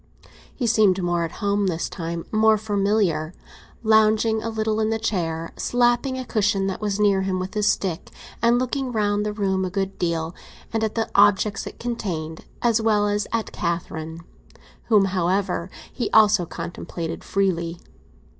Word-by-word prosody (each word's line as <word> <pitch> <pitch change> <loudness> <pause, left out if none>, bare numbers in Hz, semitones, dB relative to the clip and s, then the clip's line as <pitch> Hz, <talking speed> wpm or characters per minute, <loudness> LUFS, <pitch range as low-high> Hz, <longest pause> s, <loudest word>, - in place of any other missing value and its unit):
He 250 - -2
seemed 215 -4 +4
more 175 -1 +1
at 165 - -7
home 200 0 +1
this 170 -2 -1
time—more 195 +6 +1
familiar; 200 -6 0 0.5
lounging 220 0 +3
a 230 - -3
little 220 -1 -1
in 220 0 +1
the 225 - 0
chair, 165 -7 -2
slapping 245 +2 +1
a 255 - -4
cushion 205 -4 +1
that 195 +1 -3
was 205 -1 -1
near 200 -2 +3
him 190 -1 -1
with 185 +1 -4
his 210 -1 +1
stick, 185 -4 -1 0.3
and 235 +1 +4
looking 255 +1 -1
round 210 -2 +1
the 210 - -1
room 195 -2 0
a 185 - -1
good 195 +1 -3
deal, 165 -1 -1 0.4
and 225 -1 0
at 220 - -1
the 225 -1 0
objects 205 +1 +3
it - - -9
contained, 175 -10 -4 0.2
as 230 -2 +3
well 210 -2 +2
as 205 0 -1
at 230 -1 -2
Catherine; 165 -1 -4 0.6
whom, 210 -3 +4
however, 185 -1 0 0.2
he 240 - -2
also 210 -5 +5
contemplated 170 -1 -6
freely. 175 -4 -1
205 Hz, 160 wpm, -23 LUFS, 175-220 Hz, 0.6 s, also